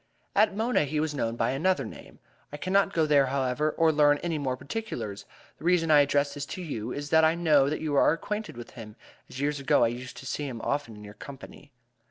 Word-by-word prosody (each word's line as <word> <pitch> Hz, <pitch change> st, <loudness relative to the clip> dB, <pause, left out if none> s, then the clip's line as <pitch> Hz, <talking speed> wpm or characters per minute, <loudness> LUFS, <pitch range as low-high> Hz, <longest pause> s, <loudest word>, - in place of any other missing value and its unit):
"At 210 Hz, 0 st, +3 dB
Mona 225 Hz, -7 st, +1 dB
he 150 Hz, +2 st, -2 dB
was 155 Hz, -1 st, -1 dB
known 115 Hz, -5 st, -2 dB
by -, -, 0 dB
another 145 Hz, +1 st, +1 dB
name. -, -, -11 dB, 0.3 s
I 145 Hz, -, -6 dB
cannot 195 Hz, +4 st, +1 dB
go 160 Hz, -4 st, +2 dB
there, 145 Hz, -3 st, +4 dB
however, 135 Hz, +2 st, 0 dB
or 165 Hz, -1 st, +4 dB
learn 145 Hz, -1 st, +4 dB
any 165 Hz, -3 st, -1 dB
more 130 Hz, -3 st, -2 dB
particulars. 125 Hz, -, -5 dB, 0.3 s
The -, -, -13 dB
reason 170 Hz, -2 st, +2 dB
I 150 Hz, -1 st, +7 dB
address 145 Hz, 0 st, +1 dB
this 140 Hz, -1 st, -6 dB
to 185 Hz, -, -6 dB
you 115 Hz, -10 st, -5 dB
is 145 Hz, 0 st, -5 dB
that 160 Hz, 0 st, +5 dB
I 160 Hz, +1 st, +4 dB
know 150 Hz, -5 st, +3 dB
that 155 Hz, -, -3 dB
you 155 Hz, -2 st, -2 dB
are -, -, +5 dB
acquainted 210 Hz, -, -4 dB
with 120 Hz, -, -9 dB
him, 105 Hz, -3 st, -10 dB, 0.3 s
as 130 Hz, -, -8 dB
years 145 Hz, +1 st, -1 dB
ago 140 Hz, -1 st, +3 dB
I 115 Hz, -, +3 dB
used 125 Hz, +2 st, -7 dB
to -, -, -10 dB
see 145 Hz, +2 st, -3 dB
him 120 Hz, -4 st, -6 dB
often 140 Hz, -6 st, -2 dB
in 105 Hz, -, -12 dB
your 105 Hz, 0 st, -10 dB
company. 140 Hz, +4 st, -12 dB
145 Hz, 235 wpm, -27 LUFS, 130-160 Hz, 0.3 s, I